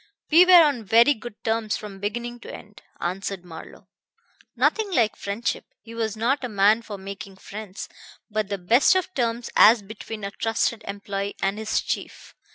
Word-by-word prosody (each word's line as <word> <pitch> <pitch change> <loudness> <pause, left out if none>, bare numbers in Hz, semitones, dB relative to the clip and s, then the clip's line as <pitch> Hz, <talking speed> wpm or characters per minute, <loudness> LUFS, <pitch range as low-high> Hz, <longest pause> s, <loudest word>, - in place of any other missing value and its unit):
"We 340 +4 +8
were 360 -2 +9
on 280 -7 0
very 230 +7 +5
good 220 -3 -11
terms 225 -1 -1
from 200 -2 -9
beginning 240 +4 -4
to - - -10
end," 205 0 -12 0.2
answered 185 +1 -4
Marlowe. 165 -2 -12 0.7
"Nothing 440 -2 +1
like 230 - +2
friendship 200 +4 -3 0.2
he 225 +2 -13
was 220 -2 -3
not 255 +6 0
a 250 - -3
man 210 +2 +3
for 215 -3 -8
making 195 0 -9
friends 200 0 -8 0.4
but 215 -2 -2
the 200 - -2
best 230 - +4
of 370 0 -1
terms 235 -4 -2
as 220 0 +7
between 215 +1 -8
a 200 - -4
trusted 225 +1 -1
employee 200 0 -4
and 195 +2 -1
his 220 0 0
chief. - - -5
220 Hz, 170 wpm, -24 LUFS, 200-235 Hz, 0.7 s, were